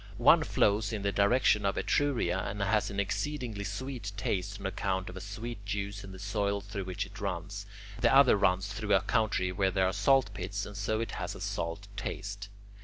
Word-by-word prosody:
One - - +6
flows 105 0 +2
in 105 -3 -3
the 100 - +1
direction 105 +1 +3
of 100 0 0
Etruria 125 -11 +1
and 100 +2 -4
has 105 +2 +2
an 100 -1 -3
exceedingly 115 +1 -2
sweet 110 +1 -4
taste 100 0 -2
on 100 - -8
account 95 -1 -1
of - - -11
a 95 - -6
sweet 105 +2 -6
juice 100 0 -3
in 95 - -9
the 95 - -9
soil 100 +1 -1
through 100 -1 -6
which 95 +3 -3
it 100 - -12
runs; 100 +1 -4 0.3
the 115 0 +4
other 135 -3 +7
runs 95 0 +2
through 105 0 +1
a - - +4
country 110 -5 +1
where 95 +1 +1
there 95 0 +2
are 95 - +1
salt 105 +1 +3
pits, 100 +2 -3
and 100 - -9
so 110 +3 -1
it 115 - -3
has - - -4
a - - -9
salt 85 +4 -3
taste. 100 +1 -5
100 Hz, 205 wpm, -31 LUFS, 95-105 Hz, 0.3 s, other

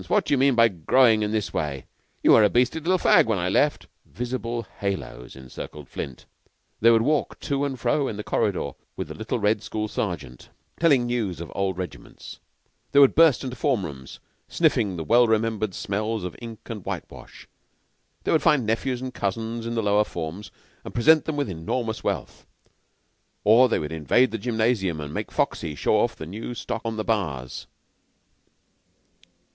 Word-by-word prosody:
What - - +2
do - - 0
you - - +4
mean 135 -1 +4
by 115 0 +6
growing 110 +6 +3
in 105 0 -1
this 110 -2 -2
way? 75 -5 -3 0.4
You - - +6
were 110 - +7
a 105 - +5
beastly 125 +8 +1
little 185 +4 +2
fag - - +5
when 110 -3 +1
I 90 0 -1
left," 145 +9 +1 0.2
visible 120 -1 -4
haloes 95 -11 -4
encircled 65 +2 -9
Flint. 65 - -7 0.5
They 115 - +5
would 115 -1 +5
walk 150 +2 0
to 140 0 -1
and 135 -3 -4
fro 130 +4 +1
in 105 - -4
the 105 - -5
corridor - - -1 0.2
with - - -5
the - - -5
little - - -3
red 105 0 +1
school 110 -1 -3
sergeant, 75 - -5 0.3
telling 145 -7 +4
news 115 -8 -2
of 85 - -7
old 95 -2 -1
regiments; 90 -1 -8 0.5
they 140 - +5
would 140 -2 +7
burst 160 -5 +5
into 130 -1 -5
form 125 -9 0
rooms 65 -4 -9 0.3
sniffing 95 -4 +1
the 80 - -3
well 120 +7 +4
remembered 110 -3 0
smells 105 +2 -2
of 90 -2 -5
ink 115 -2 -8
and 105 -4 -6
whitewash; - - -8 0.8
they - - 0
would 160 - +3
find 150 -7 +3
nephews 120 +3 -1
and 130 -1 -5
cousins 115 +3 -3
in 115 - -3
the 115 - 0
lower 105 +1 +3
forms 90 +2 -6 0.3
and - - -9
present 155 +7 +5
them 160 - -2
with 145 -2 -1
enormous 110 +6 -3
wealth; - - -4 1.0
or 120 +5 +6
they - - +2
would 75 - -4
invade 80 - +2
the 115 - -3
gymnasium 110 -6 0
and 75 -1 -6
make - - -4
Foxy 80 -3 -1
show - - +2
off - - +1
the 80 - -8
new 110 +8 -6
stock 115 - -4
on 115 -1 -3
the 110 - -1
bars. 80 - -3
110 Hz, 185 wpm, -24 LUFS, 95-125 Hz, 1.0 s, were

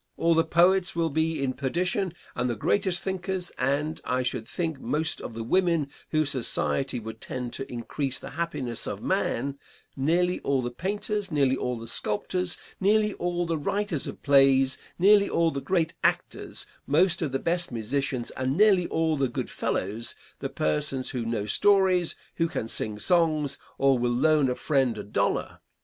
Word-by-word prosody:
All 165 0 +3
the 165 0 +4
poets 180 +3 +3
will 165 -2 +1
be 160 0 0
in 130 -1 0
perdition, 180 +7 -1 0.2
and 125 +1 0
the 120 - -1
greatest 185 - +1
thinkers, 190 -1 -3
and, 145 +4 0
I 125 0 0
should 115 -3 -3
think, 160 +1 -3
most 160 +3 -1
of 115 - -7
the 115 - -4
women 170 +1 +2 0.2
whose 155 -2 +1
society 135 0 -1
would 110 0 -8
tend 125 -2 -5
to 135 - -6
increase 130 +3 -2
the - - -8
happiness 140 -8 -2
of - - -5
man; 140 +3 -1 0.4
nearly 175 +6 +1
all 135 -2 0
the 120 - -3
painters, 205 - -2
nearly 140 -3 +3
all 125 -2 -2
the 115 - -8
sculptors, 175 - 0 0.2
nearly 210 +1 +3
all 175 0 -1
the 165 -2 -1
writers 190 -1 -1
of - - -8
plays, 135 -2 +5 0.2
nearly 200 +2 +5
all 165 -1 +2
the 140 - -4
great 170 -2 0
actors, - - -1 0.2
most 170 +5 +3
of 155 -5 -1
the 135 - +1
best 170 +3 -1
musicians, 125 +2 -2
and 130 +3 -2
nearly 195 -4 +5
all 160 -1 +1
the 135 -2 +1
good - - -4
fellows 110 +5 -2 0.2
the - - -3
persons 75 - -1
who 125 -2 -2
know 115 -3 -1
stories, 185 - +3 0.2
who 165 - +2
can 110 - -3
sing 110 -2 -1
songs, 155 - +1 0.2
or 135 -1 +4
who - - -3
will 120 0 +1
loan 145 +2 +3
a 125 - 0
friend 135 -5 +1
a - - -5
dollar. 100 - -1
150 Hz, 175 wpm, -27 LUFS, 130-175 Hz, 0.4 s, plays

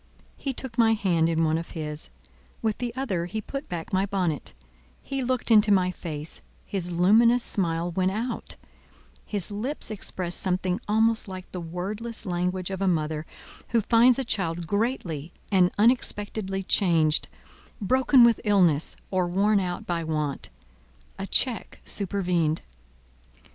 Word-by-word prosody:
He 275 - -3
took 245 -2 -6
my 225 -1 +5
hand 175 -6 +2
in 165 0 +1
one 160 0 +2
of 165 - -8
his, 150 -1 -3 0.5
with 220 -2 0
the 245 -1 -2
other 195 -11 -2
he 220 +4 -4
put 275 +7 -6
back 170 0 -5
my 190 +1 +2
bonnet; 180 -7 -2 0.4
he 270 -1 -4
looked 250 -1 -1
into 210 -1 +6
my 185 -2 +3
face, 155 -3 -6 0.2
his 180 -3 -2
luminous 225 +8 +5
smile 170 -2 0
went 185 +2 +1
out, 225 +5 -4 0.7
his 205 -2 -1
lips 225 +6 -2
expressed 185 -4 -2
something 185 +2 0
almost 220 +1 +2
like 185 -1 -8
the 180 - -5
wordless 205 +8 -4
language 180 0 -1
of 190 0 -4
a 195 - +2
mother 155 -2 -1 0.4
who 230 -1 +2
finds 235 +3 +5
a 270 - -1
child 175 -7 -2
greatly 180 - -2 0.2
and 185 -2 +5
unexpectedly 205 -3 +1
changed, 165 -6 +2 0.5
broken 260 +4 +4
with 235 -2 +4
illness, 180 -8 +3 0.2
or 185 -2 +1
worn 200 +4 +2
out 180 -2 -3
by 170 -1 -2
want. 150 - -2 0.7
A 195 - -4
check 245 +1 0
supervened. 175 -5 0
190 Hz, 145 wpm, -26 LUFS, 170-220 Hz, 0.7 s, into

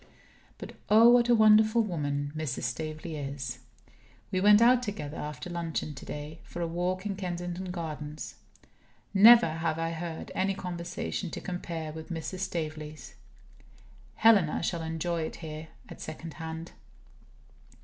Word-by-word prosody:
But, - - -8 0.2
oh, 225 +3 +8
what 240 0 +5
a 240 - +7
wonderful 220 +1 +6
woman 145 -6 -2
Mrs. 155 -5 -3
Staveley 155 +6 -4
is! 135 -4 -5 0.7
We 185 -2 0
went 205 +1 +7
out 245 +2 +6
together, 195 -10 -5
after 150 +3 -5
luncheon 165 -3 -3
today, 150 +3 -7
for - - -9
a 170 - 0
walk 180 +3 -2
in 200 -2 -2
Kensington 175 -1 -4
Gardens. 155 -4 -5 0.8
Never 225 +2 +9
have 160 0 -2
I 165 0 -1
heard 165 0 -5
any 195 +1 0
conversation 180 0 -4
to - - -5
compare 170 -3 -5
with 160 0 -9
Mrs. 170 +2 -4
Staveley's. 155 -4 -5 1.0
Helena 200 -10 +4
shall 170 0 -1
enjoy 165 +1 -2
it 160 - -4
here, 155 -1 -7 0.2
at - - -11
second 155 0 -7
hand. 160 0 -6
165 Hz, 140 wpm, -29 LUFS, 155-190 Hz, 1.0 s, Never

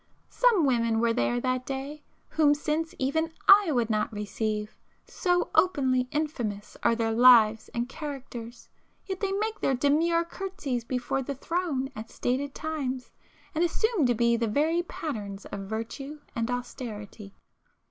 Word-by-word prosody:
Some 455 -10 +4
women 230 -4 +2
were 230 0 +2
there 245 0 +1
that 255 0 -1
day 275 +3 -5 0.3
whom 295 -2 +4
since 310 +2 -2
even 320 +5 0 0.2
I 395 -4 +8
would 240 -4 +1
not 215 +2 0
receive—so 215 - -3
openly 260 -8 +3
infamous 240 -10 -3
are 230 - +3
their 225 -1 0
lives 225 -2 +6
and 240 +1 -1
characters, 260 -5 -7 0.4
yet 380 -1 -4
they 395 -2 -1
make 435 +2 -2
their 270 - +2
demure 325 +6 +2
curtseys 335 - -4
before 250 +2 -2
the 275 +2 -4
Throne 295 -3 -2
at 220 +1 -7
stated 270 +3 -2
times, 275 -5 -4 0.4
and 325 +1 +1
assume 350 - +2
to 245 - +2
be 235 +1 +3
the 230 0 0
very 310 +9 +2
patterns 210 - -6
of 195 -1 -6
virtue 270 +7 -5 0.2
and 230 0 -1
austerity. 220 -5 -6
260 Hz, 145 wpm, -28 LUFS, 230-315 Hz, 0.4 s, I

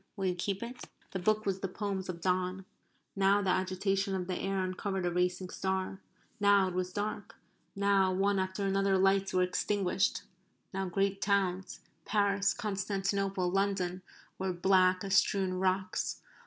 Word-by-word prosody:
Will 195 - -2
you 185 - +2
keep 195 +4 -3
it?" 245 +2 -7 0.3
(The 190 - -3
book 215 +4 +1
was 195 -1 0
the 195 - -2
poems 190 0 -4
of 170 -2 -5
Donne.) 185 +1 0 0.5
Now 200 +1 +3
the 190 - +2
agitation 190 +1 0
of 185 -1 -2
the 185 0 -3
air 195 +1 -1
uncovered 185 0 -2
a 175 - +1
racing 180 +1 0
star. 190 0 -2 0.4
Now 200 -2 +5
it - - -7
was 180 0 -2
dark. 210 +2 -4 0.4
Now 195 -1 +3
one 195 +1 +2
after 190 +1 -2
another 195 0 +2
lights 195 +1 +3
were 185 0 +3
extinguished. 190 +1 0 0.5
Now 190 -1 -2
great 195 +1 0
towns 190 -2 0 0.2
Paris 200 -1 +2
Constantinople 195 -3 -1
London 190 -2 0 0.4
were 190 0 -1
black 185 +1 +3
as 195 -1 -2
strewn 190 -2 +2
rocks. 185 0 0
190 Hz, 155 wpm, -31 LUFS, 185-200 Hz, 0.5 s, Now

